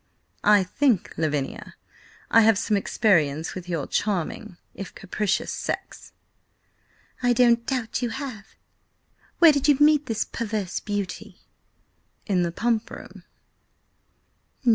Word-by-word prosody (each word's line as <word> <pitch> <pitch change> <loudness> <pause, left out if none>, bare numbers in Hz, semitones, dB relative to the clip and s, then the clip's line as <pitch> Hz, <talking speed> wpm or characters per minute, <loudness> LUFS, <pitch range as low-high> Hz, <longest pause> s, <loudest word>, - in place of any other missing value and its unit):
I 210 -2 +5
think, 235 +2 0
Lavinia, 150 -4 -3 0.6
I 230 - +7
have 220 -2 +4
some 215 0 0
experience 165 -7 +1
with 180 -1 -8
your 165 -5 -2
charming, 200 0 -2 0.2
if 195 - -9
capricious 195 +1 -2
sex." - - -5 1.1
"I 245 -1 +3
don't 235 -1 +3
doubt 250 -4 -2
you 245 - -1
have. 240 -5 -7 0.8
Where 335 -2 +8
did 285 -1 0
you 290 -2 +5
meet 295 -1 +4
this 225 -2 -1
perverse 215 -5 -3
beauty?" 205 -3 -5 0.8
"In 190 -4 +1
the 170 -1 0
Pump 230 +4 -1
Room." - - -11
215 Hz, 120 wpm, -24 LUFS, 185-240 Hz, 1.1 s, Where